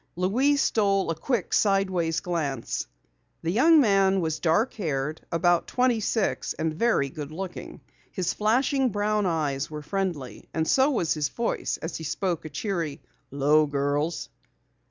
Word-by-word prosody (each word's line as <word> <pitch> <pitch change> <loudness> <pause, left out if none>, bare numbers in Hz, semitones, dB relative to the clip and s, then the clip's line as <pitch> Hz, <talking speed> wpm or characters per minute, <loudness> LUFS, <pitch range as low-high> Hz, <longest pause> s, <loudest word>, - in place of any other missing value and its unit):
Louise 255 +11 +2
stole 195 -4 +1
a - - -2
quick 225 - -2
sideways 190 -5 +1
glance. 155 - -3 0.6
The 165 - 0
young 310 - +6
man 195 -5 +4
was 160 -3 -2
dark 180 +9 +2
haired, 155 -5 -3
about 175 0 +2
twenty 250 -2 +2
six 215 0 -1
and 160 0 -2
very 205 -5 +2
good 145 +2 -7
looking. 185 +3 -7 0.3
His 185 -3 -1
flashing 255 +5 +2
brown 210 -1 0
eyes 150 -4 -1
were 150 -1 -7
friendly 175 -7 -4
and 160 -1 0
so 270 +2 +4
was 175 - +1
his 150 -2 -1
voice 235 +8 -2
as 165 0 -4
he 160 - -8
spoke 170 +1 -2
a - - -5
cheery, 165 -2 -3 0.3
"'Lo, 150 +2 +3
girls." 145 +3 -1
175 Hz, 150 wpm, -26 LUFS, 155-210 Hz, 0.6 s, young